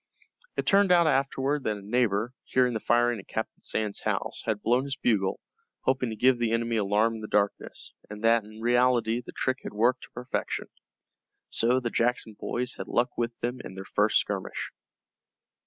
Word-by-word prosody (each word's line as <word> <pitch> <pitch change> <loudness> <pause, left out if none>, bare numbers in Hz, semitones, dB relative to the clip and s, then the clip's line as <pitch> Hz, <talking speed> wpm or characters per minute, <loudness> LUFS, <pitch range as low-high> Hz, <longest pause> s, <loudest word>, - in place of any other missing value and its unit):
It - - 0
turned 200 -1 +4
out 175 -1 +6
afterward 135 0 +1
that 105 -1 0
a - - -10
neighbor, 110 +1 +1
hearing 125 -1 +2
the 110 - -1
firing 120 +1 +2
at 100 - -12
Captain - - -4
Sands' 105 -2 -2
house, - - -2
had 105 -2 -1
blown 125 +4 +2
his 140 -1 -3
bugle, 100 -7 +1 0.4
hoping 130 -2 +1
to 110 - -4
give 125 +2 +4
the 115 -1 +1
enemy 115 0 0
alarm 105 +2 +2
in 110 - -6
the 105 - -5
darkness, 100 -1 -1 0.2
and 105 +1 -8
that 115 0 +4
in 110 +1 -12
reality 120 -1 +3
the - - -9
trick 130 0 -1
had - - -7
worked 120 +4 +2
to - - -22
perfection. 125 +1 -4 0.8
So 125 +3 +3
the 120 -2 -3
Jackson 120 -2 0
boys 125 +4 -3
had - - -6
luck 120 +1 0
with 115 0 -2
them 120 +2 -2
in 95 - -9
their 95 0 -7
first - - +3
skirmish. - - -2
120 Hz, 190 wpm, -28 LUFS, 110-125 Hz, 0.8 s, out